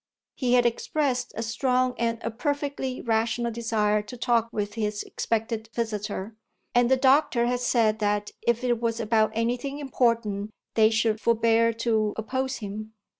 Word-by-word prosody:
He 250 -2 0
had 245 -1 +5
expressed 250 +1 0
a 225 - -3
strong 250 +2 +1
and 230 0 0
a 230 - -2
perfectly 280 +1 -3
rational 230 +1 0
desire 220 -2 +1
to 230 +4 -10
talk 235 -2 +1
with 205 -1 -3
his 210 -2 -2
expected 225 0 -2
visitor, 215 -2 -3 0.4
and 245 0 +4
the 265 - +4
doctor 260 -2 +3
had 245 0 0
said 230 -3 +2
that 205 -1 0
if 235 +1 +1
it 240 -2 +1
was 230 -1 -1
about 220 -1 +2
anything 245 +5 -1
important 230 -7 0 0.2
they 220 -1 +5
should 220 -1 +1
forbear 230 0 +3
to 220 -2 0
oppose 260 +4 -2
him. 215 0 -7
230 Hz, 155 wpm, -26 LUFS, 220-245 Hz, 0.4 s, had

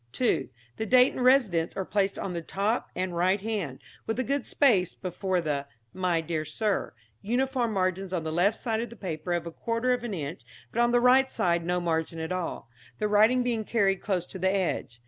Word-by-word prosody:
(2) 235 - +1 0.3
The 220 - -3
date 255 +3 +5
and 255 - -2
residence 225 -11 +3
are 190 - -1
placed 200 0 0
on 190 - -4
the 170 - -3
top 200 +7 -1
and 185 -1 -2
right 185 +4 +2
hand, 195 -10 -3 0.3
with 225 - -1
a 255 - +1
good 275 +2 -1
space 210 - +3
before 185 0 -2
the 145 -3 -2 0.3
'My 180 -3 0
Dear 160 -1 -2
Sir,' 195 - -2 0.3
uniform 245 +1 0
margins 185 0 -1
on 175 -3 -1
the 160 - -3
left 195 +6 +2
side 225 -2 -1
of 240 - -4
the 235 - -11
paper 175 -5 -5
of 170 -1 -1
a 170 - -5
quarter 230 +7 0
of 245 -1 -2
an 225 -5 -3
inch, 155 +1 -5 0.3
but 235 - +1
on 240 - +4
the 245 0 +4
right 260 +2 +5
side 170 -1 +1
no 180 +1 0
margin 165 -1 -1
at 160 +1 -4
all, 180 -9 -3 0.3
the 210 - 0
writing 220 +5 +4
being 235 -3 -1
carried 195 -4 +1
close 185 -4 -1
to 190 - -9
the 190 +1 +2
edge. 185 -10 -1
195 Hz, 215 wpm, -28 LUFS, 175-235 Hz, 0.3 s, date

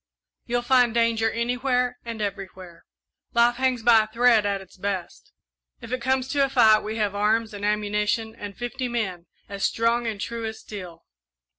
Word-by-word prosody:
You'll 240 0 -1
find 245 -2 +3
danger 230 -1 +2
anywhere 250 +1 -1
and 230 -2 -5
everywhere 190 -3 -7 0.5
life 235 0 +4
hangs 255 -3 0
by 225 -2 +6
a - - -14
thread 230 -1 +3
at 200 -1 -1
its 190 -1 -15
best. 190 -2 -5 0.5
If 230 - -10
it 255 -1 -2
comes 260 +1 0
to 280 -1 +2
a 275 - +1
fight, 225 -5 +5
we 215 +1 -5
have 210 -2 0
arms 215 +2 +1
and 205 0 -8
ammunition 210 +1 0
and 205 -3 -9
fifty 250 +1 -4
men, 190 -8 -3 0.2
as 200 -1 -6
strong 230 +1 +1
and 215 -3 -3
true 230 +3 -4
as 220 0 -5
steel. 180 -5 -9
225 Hz, 175 wpm, -24 LUFS, 205-240 Hz, 0.5 s, by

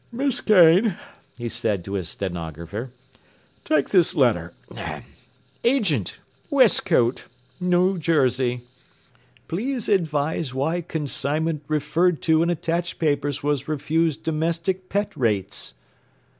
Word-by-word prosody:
“Miss 265 +2 0
Kane,” 185 0 +5 0.4
he 120 -1 -4
said 110 -6 -2
to 100 - -6
his 90 -5 -3
stenographer, 85 - -5 0.7
“take 310 - +1
this 180 -4 +3
letter. 110 - +2 1.1
'Agent, 200 - +1 0.3
Westcote, 120 +1 +3 0.4
N. 180 +1 +2
J. 130 -6 +1 0.9
Please 240 +7 -3
advise 155 -6 0
why 160 +6 0
consignment 155 -1 -1
referred 155 +3 +1
to 160 -1 +3
in 170 - +2
attached 170 +1 -2
papers 145 -3 -1
was 145 -2 -1
refused 155 +1 0
domestic 165 +4 -1
pet 205 +1 -1
rates. 105 -6 -2
155 Hz, 100 wpm, -23 LUFS, 125-175 Hz, 1.1 s, Kane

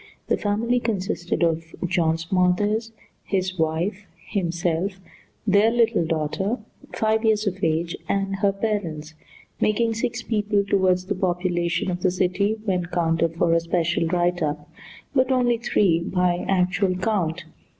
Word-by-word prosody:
The - - +3
family 225 +4 0
consisted 190 -6 -2
of 165 -1 -1
John 165 -2 +1
Smothers, 190 +6 +1 0.3
his 185 -2 -2
wife, 170 +6 -1 0.2
himself, 175 0 -1 0.5
their 205 +2 +4
little 230 -4 +2
daughter, 165 +7 -1 0.3
five 220 0 +1
years 215 -1 +2
of 195 -3 -3
age, 165 +1 0
and 195 0 0
her 200 0 +2
parents, 190 -7 -3 0.5
making 225 +2 +2
six 245 +1 -2
people 210 -2 +1
toward 190 -2 +3
the 185 +2 -4
population 180 -1 0
of 180 0 -4
the 185 - +3
city 190 +4 0
when 180 -4 0
counted 165 -1 0
for 165 0 +2
a 165 - +4
special 170 0 0
write 175 +1 +1
up, 150 -1 -2 0.5
but 260 -1 +2
only 245 -2 +2
three 195 -7 +2
by 180 0 0
actual 185 0 +2
count. 185 -4 -1
185 Hz, 140 wpm, -24 LUFS, 170-210 Hz, 0.5 s, their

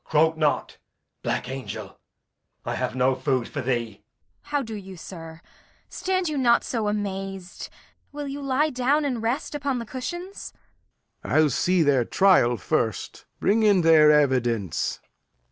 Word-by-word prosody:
Croak 160 +1 +2
not, 155 -2 -1 0.4
black - - -2
angel; 130 0 -7 0.7
I - - -2
have - - -2
no 130 +1 +3
food 130 -2 -1
for 145 - -4
thee. 120 -4 -2
Kent. 105 - -37 0.4
How 290 -1 -1
do 225 -2 -7
you, 195 -3 -8
sir? 165 -1 -10 0.5
Stand 370 -1 -1
you 300 -3 -1
not 235 -2 +4
so 225 -4 -2
amaz'd. 195 -2 -4 0.4
Will 290 0 -5
you 280 +1 -5
lie 280 +3 +1
down 275 +4 +1
and 250 -5 -2
rest 235 +7 -2
upon 280 -3 -1
the 235 - -4
cushions? 345 - -6 0.7
Lear. - - -4
I'll 155 -1 +5
see 180 +6 +2
their 140 -4 +3
trial 125 -7 +4
first. - - -2
Bring 215 +3 +2
in 205 -4 +4
their 160 -2 +6
evidence. 120 - +1
190 Hz, 150 wpm, -25 LUFS, -, 0.7 s, their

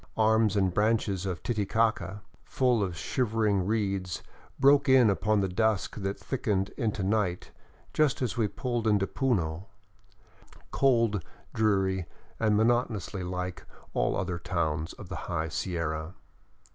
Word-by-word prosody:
Arms 110 -1 +3
and 95 -3 +2
branches 105 -2 +1
of 90 -2 -4
Titicaca, 110 -2 0 0.2
full 125 -4 +1
of 90 -4 -2
shivering 105 -4 0
reeds, 100 -4 -1 0.4
broke 140 0 +5
in 130 -5 +6
upon 105 +1 +1
the 95 - +1
dusk 105 +2 0
that 95 -1 -3
thickened 100 -7 -1
into 110 -6 -2
night 95 -3 0 0.4
just 155 -3 +2
as 125 -4 -1
we 115 -3 +1
pulled 120 0 -2
into 105 -2 +3
Puno, 95 - -1 1.1
cold, 115 -8 +2 0.3
dreary, 95 -4 +1 0.3
and 105 -2 +3
monotonously 110 -4 +1
like 90 0 -4 0.3
all - - +1
other 90 -2 -2
towns 80 -2 -2
of 100 - -11
the 95 - -6
high 80 -2 -1
Sierra. 85 0 -3
100 Hz, 130 wpm, -28 LUFS, 90-115 Hz, 1.1 s, in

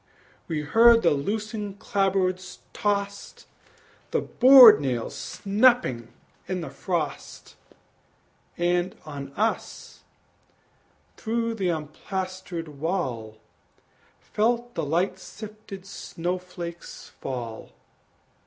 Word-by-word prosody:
We 160 -3 -2
heard 230 +9 +5
the 170 - +5
loosened 205 +6 -3
clapboards 190 -2 -1 0.2
tost, 200 -1 -3 0.6
The - - 0
board 250 - +8
nails 125 -4 -2
snapping 205 - +1 0.4
in 185 -1 -2
the 165 - -6
frost; 160 -7 -4 1.0
And 175 +1 0
on 140 -2 -7
us, 220 +6 -3 1.2
through 230 0 -1
the 195 -5 -1
unplastered 170 0 -5
wall, 130 - -3 0.8
Felt 235 +2 -1
the - - -2
light 175 +6 0
sifted 210 -2 -10
snow 180 -2 -4
flakes 175 -1 -9
fall. 120 -4 -6
185 Hz, 90 wpm, -25 LUFS, 160-210 Hz, 1.2 s, board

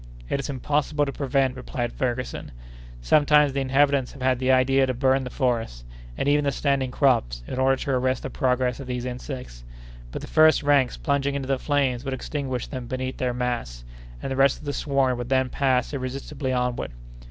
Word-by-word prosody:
"It - - 0
is 140 - -4
impossible 145 +2 0
to 140 - -3
prevent 135 -2 0
it," - - -12
replied 125 -2 -4
Ferguson. 125 - -3 0.5
"Sometimes 150 - +4
the 140 - 0
inhabitants 135 0 +2
have 140 - -12
had 130 -1 +2
the 130 0 +2
idea 130 +1 +4
to 130 - -1
burn 130 +1 +2
the 125 - -5
forests, 115 - -1 0.3
and - - -1
even 145 +1 +3
the 140 - +1
standing 135 -1 0
crops, 115 - +1
in 130 - -5
order 135 0 +4
to 140 - -3
arrest 130 0 0
the 135 - -5
progress 125 -1 0
of 135 - -7
these 125 -1 -3
insects; 125 - -7 0.5
but - - -6
the - - -7
first 155 -1 +5
ranks 140 -3 +3
plunging 140 -1 0
into 135 -2 -3
the 135 -1 0
flames 135 -4 0
would 135 -1 -2
extinguish 130 -2 -3
them 130 -4 -6
beneath 130 +1 -4
their 125 -1 0
mass, 120 - -3 0.4
and - - -3
the - - -1
rest 135 0 +4
of - - -13
the 145 - -2
swarm 135 -4 +1
would 120 0 -5
then 130 -1 +2
pass 130 -1 +1
irresistibly 135 +1 -4
onward. 125 -1 -1
130 Hz, 200 wpm, -25 LUFS, 125-140 Hz, 0.5 s, first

